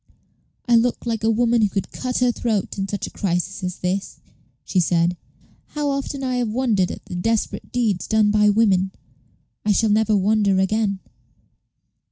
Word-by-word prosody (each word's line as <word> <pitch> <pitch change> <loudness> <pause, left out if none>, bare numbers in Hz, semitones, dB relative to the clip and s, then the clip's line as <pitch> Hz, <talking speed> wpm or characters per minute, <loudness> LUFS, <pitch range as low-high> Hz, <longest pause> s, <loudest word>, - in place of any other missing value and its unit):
"I 240 - +4
look 235 +2 +1
like 225 -2 -2
a 220 - +3
woman 235 +1 +2
who 210 - +3
could 195 0 -3
cut 255 -1 -3
her 250 -1 +4
throat 220 -5 -2
in 195 - -1
such 205 0 -3
a - - -8
crisis 190 +1 -2
as 180 -1 -3
this," 185 +2 -3 0.5
she 185 - 0
said. 170 0 +2 0.6
"How 295 -1 0
often 275 0 -3
I 255 -1 -1
have 240 -3 0
wondered 215 -6 +1
at - - -8
the - - -9
desperate 220 +5 -2
deeds 225 -7 0
done 215 -1 +3
by 210 0 +4
women! 195 -3 +2 0.7
I 210 - +2
shall 220 +1 +2
never 215 0 +3
wonder 200 0 +2
again." 200 0 0
215 Hz, 175 wpm, -22 LUFS, 190-230 Hz, 0.7 s, I